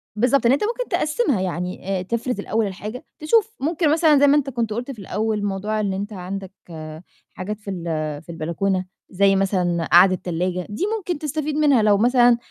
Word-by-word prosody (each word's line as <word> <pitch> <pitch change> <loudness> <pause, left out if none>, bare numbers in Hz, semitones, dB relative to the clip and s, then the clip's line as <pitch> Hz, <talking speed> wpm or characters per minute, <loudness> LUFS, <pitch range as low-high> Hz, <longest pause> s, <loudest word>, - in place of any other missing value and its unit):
بالضبط. 250 +3 +2
إن 235 - +5
أنت 280 - +2
ممكن 480 +3 -2
تقسِّمها، 300 - 0
يعني 185 +1 -3
آآ - - -3
تفرز 235 +3 -3
الأول 220 +1 0
الحاجة 210 +6 -7
تشوف 440 +7 +2
ممكن 310 +2 +1
مثلًا 315 -3 +4
زي 285 - +5
ما 285 - +5
أنت 275 -1 0
كنت 230 -4 -2
قُلت 245 +4 -4
في 230 - -10
الأول 210 +2 -2
موضوع 205 +2 -2
إن 200 -2 -1
أنت 205 +3 -4
عندك 190 0 -6 0.8
حاجات 205 +4 -5
في 205 - -9
ال 175 -3 -5 0.4
في 170 - -10
البلكونة 180 +4 -1 0.2
زي 195 +1 +3
مثلًا 180 -4 0
قاعدة 185 +2 +7
تلاجة 180 +1 -3
دي 210 - -4
ممكن 350 -6 -4
تستفيد 305 0 -3
منها 285 -6 +4
لو 205 -1 +4
مثلًا 240 +1 +4
215 Hz, 185 wpm, -22 LUFS, 190-275 Hz, 0.8 s, قاعدة